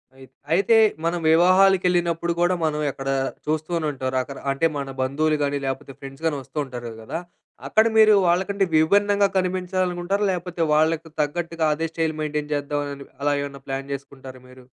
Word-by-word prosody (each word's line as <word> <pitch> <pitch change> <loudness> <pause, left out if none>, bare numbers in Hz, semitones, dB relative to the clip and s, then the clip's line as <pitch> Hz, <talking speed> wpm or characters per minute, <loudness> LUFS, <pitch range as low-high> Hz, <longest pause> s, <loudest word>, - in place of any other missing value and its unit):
అయి 135 0 -14 0.3
అయితే 200 +6 +4 0.3
మనం 170 +1 0
వివాహాలకెళ్ళినప్పుడు 175 -1 +3
కూడా 175 +1 +3
మనం 150 -1 -1
ఎక్కడ 135 0 -6 0.4
చూస్తూనే 155 +2 -1
ఉంటారు. 130 -1 -4
రకరకా 135 +2 -6
అంటే 140 +4 0
మన 140 -1 -4
బంధువులుగాని, 145 +1 0
లేకపోతే 135 +1 -4
ఫ్రెండ్సగాని 140 +3 -3
వస్తూ 135 - -14
ఉంటారు 120 -3 -7
కదా! 135 +9 -5 0.5
అక్కడ 220 +1 +4
మీరు 215 -1 +7
వాళ్ళకంటే 190 +3 +1
విభిన్నంగా 200 +5 +4
కనిపించాలి 185 0 0
అనుకుంటారా? 180 +4 -1
లేకపోతే 180 -1 -4
వాళ్ళకి 160 +1 +1
తగ్గట్టుగా 165 +2 -2
అదే 165 +2 -2
స్టైల్ 160 -1 -1
మెయిన్‌టైన్ 150 0 -3
చేద్దాం 145 0 -2
అని 140 0 -10 0.2
అలా 145 0 +2
ఏమైనా 140 -1 -8
ప్లాన్ 135 +1 -4
చేసుకుంటారా 135 -1 -9
మీరు? 130 0 -15
155 Hz, 150 wpm, -23 LUFS, 140-180 Hz, 0.5 s, మీరు